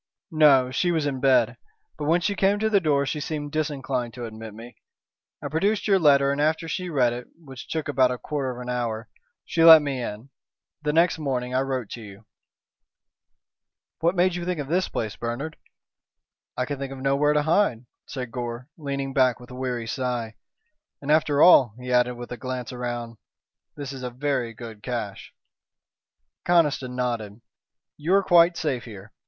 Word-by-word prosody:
"No. 140 -5 +5
She 175 +7 +1
was 160 -3 0
in 135 -2 -2
bed. 125 -4 +3 0.4
But 150 - -5
when 170 +3 +3
she 200 +4 0
came 195 +1 +2
to 220 +1 0
the 200 - +5
door 145 -5 +1
she 150 +2 -3
seemed 145 -1 -4
disinclined 135 -6 -2
to 120 -1 -5
admit 110 -1 -9
me. 115 +2 -12 0.7
I - - -2
produced 195 +10 0
your 195 -2 +4
letter, 140 -3 +4
and 140 +1 -1
after 155 +2 +1
she 180 +3 -3
read 125 -6 +2
it, 120 0 -7
which 135 -6 -11
took 160 -2 -3
about 130 -3 +3
a 125 - -2
quarter 140 0 -3
of 125 -1 -6
an 125 - -7
hour, 120 -3 -3 0.4
she 165 - +1
let 160 -2 +10
me 135 -3 -2
in. 115 +3 -7 0.5
Then 150 0 -1
next 165 0 +3
morning 130 -4 -2
I 130 - +2
wrote 130 -4 -3
to 120 - -7
you." 100 0 -12 1.7
"What 170 +3 +1
made 180 0 +3
you 175 0 -4
think 180 -2 -2
of 145 -1 -5
this 180 +3 +1
place, 110 -2 -3
Bernard?" 130 +7 -4 1.0
"I 125 - 0
could 140 +1 -5
think 135 -1 -5
of 135 - -7
nowhere 140 +3 +2
to 150 0 +2
hide," 155 - +1 0.2
said 125 -3 -6
Gore, 120 +1 -5
leaning 140 -2 -3
back 130 -2 +3
with 125 +1 -13
a - - -8
weary 125 -2 -3
sigh. 120 -2 -3 0.7
"And 145 +1 -3
after 150 -2 +4
all," 130 - +7
he 125 0 -4
added, 125 0 +3
with 120 0 -9
a 125 - -5
glance 125 0 -5
round, 120 -2 -5 0.6
"this 140 -2 -6
is 135 - -8
a 125 - -3
very 125 -2 -2
good 110 -2 -10
caché." 115 -6 -5 1.2
Conniston 150 -7 +2
nodded. 115 -4 -3 0.6
"You 165 +6 +1
are 200 - +4
quite 175 -1 +5
safe 135 -6 -2
here. 105 -2 -11
135 Hz, 185 wpm, -25 LUFS, 125-155 Hz, 1.7 s, let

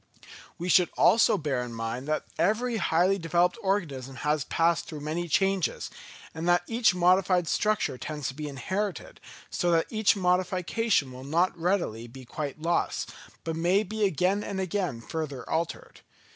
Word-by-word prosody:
We 175 - -4
should 180 0 +5
also 220 -2 +5
bear 145 -7 -1
in 120 -1 -6
mind 115 +4 -4
that 155 0 -1
every 230 +4 +1
highly 185 +1 +2
developed 175 +2 +1
organism 145 -10 -2
has 150 +1 0
passed 165 0 +1
through 155 -2 -7
many 160 +4 -3
changes; 195 +2 0 0.4
and 165 +2 -2
that 175 0 +4
each 225 -4 +2
modified 180 0 +3
structure 210 -12 0
tends 150 -2 -4
to - - -6
be 150 +2 -5
inherited, 185 +7 -4 0.3
so 175 - 0
that 165 -1 +3
each 220 -1 +3
modification 180 - +1
will 130 +1 -9
not 170 +6 +1
readily 170 - -1
be 130 +2 -12
quite 145 +3 -5
lost, 170 +2 -1 0.3
but 165 -1 -3
may 175 +5 +2
be 215 +1 -3
again 190 +2 +1
and 195 -1 -4
again 185 - -2
further 145 -1 -5
altered. 165 +1 -3
170 Hz, 160 wpm, -27 LUFS, 150-190 Hz, 0.4 s, should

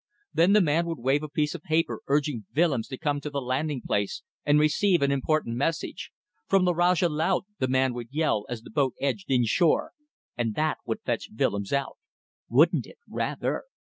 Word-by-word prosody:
Then 175 +4 +4
the 210 - +6
man 170 0 +2
would 165 - -3
wave 135 +4 +1
a 155 - -6
piece 150 +1 0
of 175 - -7
paper 160 +1 0
urging 140 -7 0
Willems 145 -8 +2
to 130 - -6
come 145 -1 -1
to 150 - -4
the 140 -1 -2
landing 135 +1 -2
place 100 -1 -1 0.2
and 145 +1 +4
receive 160 +3 +3
an 140 - +2
important 140 -3 0
message. 165 - -2 0.4
"From 195 -2 +3
the 180 - +3
Rajah 175 +1 +3
Laut" 165 +5 0
the 130 - +1
man 130 0 +2
would 120 -1 -6
yell 145 -8 0
as 120 -2 -5
the - - -12
boat 135 -4 +1
edged 130 -8 -2
in 125 -3 +3
shore, 165 - +2 0.4
and 115 -3 -1
that 155 0 0
would 110 - -2
fetch 120 -2 -3
Willems 100 -2 0
out. 140 0 -1 0.5
Wouldn't - - +4
it? - - -15
Rather! - - -2
145 Hz, 195 wpm, -27 LUFS, 130-160 Hz, 0.5 s, the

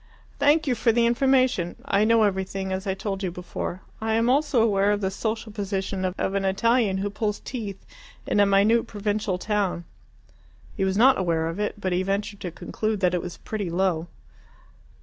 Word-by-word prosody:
"Thank 300 +2 +4
you 265 - +1
for 230 0 +2
the 235 +1 +3
information. 255 -7 +2
I 200 +2 +2
know 230 0 +4
everything, 190 -1 -1
as 190 +2 -3
I 190 - 0
told 195 -1 -4
you 190 - -1
before. 180 +1 -5 0.2
I 220 0 0
am 230 +2 +3
also 285 -2 +2
aware 200 -2 +3
of 205 - +1
the 190 -2 -1
social 220 +2 -3
position 195 -2 -3
of 185 +1 -2
an 200 0 0
Italian 205 +1 +2
who 200 +1 -2
pulls 210 0 -2
teeth 210 -6 -6 0.4
in - - +1
a 205 - +5
minute 210 +4 +3
provincial 205 -2 -2
town." 200 -3 -1 0.9
He 195 - -1
was 190 0 0
not 260 +2 +5
aware 165 -3 0
of 165 +4 -4
it, 210 0 -2
but 185 -2 -1
he 180 - +1
ventured 200 +1 -2
to 180 - -4
conclude 215 +5 -3
that 180 -1 +3
it 180 - 0
was 175 0 -7
pretty, 205 -5 -4
low. 175 -1 0
200 Hz, 190 wpm, -25 LUFS, 190-220 Hz, 0.9 s, a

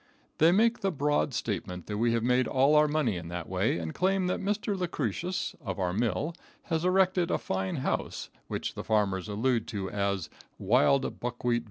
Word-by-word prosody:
They 160 +2 +6
make 225 +5 +3
the 195 -3 0
broad 145 -1 +1
statement 90 -7 -3
that 105 0 -4
we 115 +1 +3
have 115 -1 0
made 125 +1 +3
all 135 +3 +3
our 150 0 +6
money 145 -10 0
in 85 -1 -7
that 85 0 -5
way, 95 -1 0
and 80 -2 -4
claim 190 +1 +1
that 180 - 0
Mr. 205 +1 -1
Lucretius, 175 - -2
of 95 -6 -4
our 90 -2 -1
mill, 120 - 0 0.3
has 165 -1 -1
erected 185 -1 +3
a - - +2
fine 95 0 -2
house, - - -3 0.2
which - - -3
the - - -6
farmers 100 -3 0
allude 115 +3 0
to 95 -3 -4
as 100 -4 -1
the - - -27 0.2
"wild 130 +6 +2
buckwheat 120 0 -1
villa." - - 0
125 Hz, 195 wpm, -29 LUFS, -, 0.3 s, They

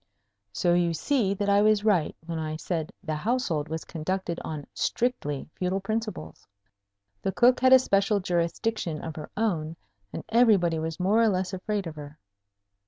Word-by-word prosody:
So 175 - +1
you 175 -1 +2
see 205 - +1
that 205 +1 -2
I 200 0 +4
was 215 0 +3
right 185 -8 +2
when 165 -1 -4
I 155 0 -3
said 160 0 -3
the 160 -4 -3
household 165 -4 -1
was 160 0 -4
conducted 175 +1 -3
on 150 -3 -5
strictly 185 - -1
feudal 185 +1 -1
principles. 215 +2 -5 0.7
The 195 - -1
Cook 245 +5 +4
had 260 0 +4
a 260 - +11
special 200 -4 +2
jurisdiction 175 0 -1
of 160 - -6
her 155 - -7
own, 165 -8 -1 0.4
and - - -6
everybody 205 -8 +4
was 160 +1 -4
more 200 +5 +3
or 230 - +5
less 185 -1 -1
afraid 200 +1 -2
of 160 -2 -7
her. 145 0 -9
185 Hz, 170 wpm, -27 LUFS, 160-215 Hz, 0.7 s, a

